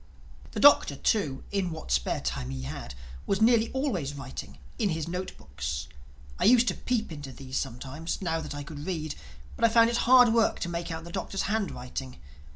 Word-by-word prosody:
The - - -3
Doctor 285 - +7
too, 145 -3 0
in 195 -3 0
what 160 - -7
spare - - +1
time 65 0 -3
he 65 -1 -5
had, 65 0 -6 0.3
was 195 - +1
nearly 230 0 +4
always 195 - -1
writing—in 70 - -5
his 160 -2 -2
note 180 +2 -4
books. 70 -1 -5 0.5
I - - +2
used 245 +2 +6
to - - 0
peep 235 -7 -2
into 145 -3 -7
these 130 0 -6
sometimes, 135 +6 -4
now 165 -4 -1
that 150 -2 -6
I 145 - -5
could 150 +1 -8
read, 155 -5 -2 0.4
but - - -6
I 230 - +7
found 230 +1 +5
it 235 - +1
hard 245 -2 +6
work 230 -1 +3
to 175 - -2
make 170 0 -3
out 160 0 -5
the 170 - -9
Doctor's 195 +1 -3
handwriting. 135 - -3
165 Hz, 190 wpm, -28 LUFS, 130-215 Hz, 0.5 s, Doctor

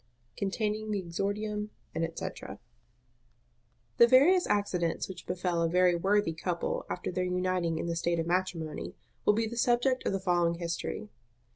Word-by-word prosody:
Containing 210 +2 -2
the 210 - 0
exordium, 205 +4 -2 0.2
&c. - - -3
The 165 0 -5 1.5
various 295 +9 +6
accidents 180 -5 0
which 190 - -9
befel 180 -1 -1
a 165 - +2
very 180 +1 +4
worthy 195 0 +2
couple 170 +1 -2
after 180 - -3
their 180 +1 -1
uniting 180 -2 0
in - - -2
the 170 0 -2
state 170 +1 0
of 165 - -1
matrimony 175 -3 -2 0.3
will 210 - +6
be 225 +1 +1
the 230 +2 -6
subject 245 +2 +2
of - - +1
the 195 - 0
following 175 -2 +2
history. 170 -10 -4
185 Hz, 150 wpm, -30 LUFS, 170-210 Hz, 1.5 s, various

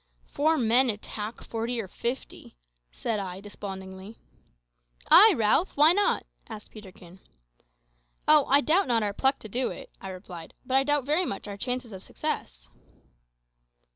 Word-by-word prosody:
"Four 315 +2 +1
men 245 +1 +4
attack 210 +1 -5
forty 230 +1 -3
or 210 - -4
fifty!" 235 - -6 0.3
said 215 - -3
I 185 -1 -6
despondingly. 195 0 -9 0.9
"Ay, 420 +3 +9
Ralph. 225 - +2
Why 305 +4 +7
not?" 405 +2 +1 0.2
asked 215 -2 -10
Peterkin. 190 -4 -13 1.1
"Oh, 300 -2 +6
I 280 +2 +5
doubt 330 +5 +2
not 230 -3 +2
our 205 -1 -1
pluck 265 +6 +1
to - - -8
do 245 +5 0
it," - - -9
I 190 - -7
replied; 180 -3 -10
"but 255 - -1
I 270 - +4
doubt 290 0 +1
very 305 +6 +1
much 195 - -5
our 200 - -6
chances 245 +1 -4
of 190 - -8
success." - - -5
225 Hz, 150 wpm, -27 LUFS, 195-270 Hz, 1.1 s, Ay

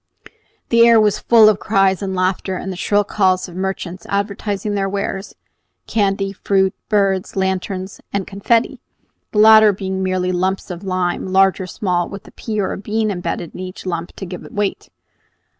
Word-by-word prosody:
The 235 0 +6
air 230 -1 +6
was 210 -1 +2
full 225 -2 +6
of 215 -2 +3
cries 195 -2 +2
and 190 -1 -3
laughter, 185 0 -1
and 190 - -5
the - - -5
shrill 205 +3 +1
calls 190 -2 +1
of 175 - -12
merchants 185 -1 -4
advertising 200 0 -2
their 195 -1 -1
wares, 200 0 -4 0.5
candy, 195 -2 0
fruit, 190 -1 +1 0.2
birds, 195 -2 +1
lanterns, 190 0 -2
and 200 -2 -2
confetti, 225 +4 0 0.5
the - - -4
latter 215 0 +8
being 190 -1 -4
merely 185 -1 0
lumps 185 +2 -1
of 175 +2 -7
lime, 185 -1 -1
large 190 +1 +3
or 185 - -5
small, 180 -1 -1
with 200 - -9
a - - -13
pea 215 -2 -4
or 195 - -1
a - - -6
bean 215 +1 -1
embedded 175 -2 -4
in - - -9
each 185 +1 -8
lump 170 -1 -4
to 195 - -6
give 180 0 -8
it - - -12
weight. 205 -1 -2
195 Hz, 180 wpm, -19 LUFS, 185-205 Hz, 0.5 s, latter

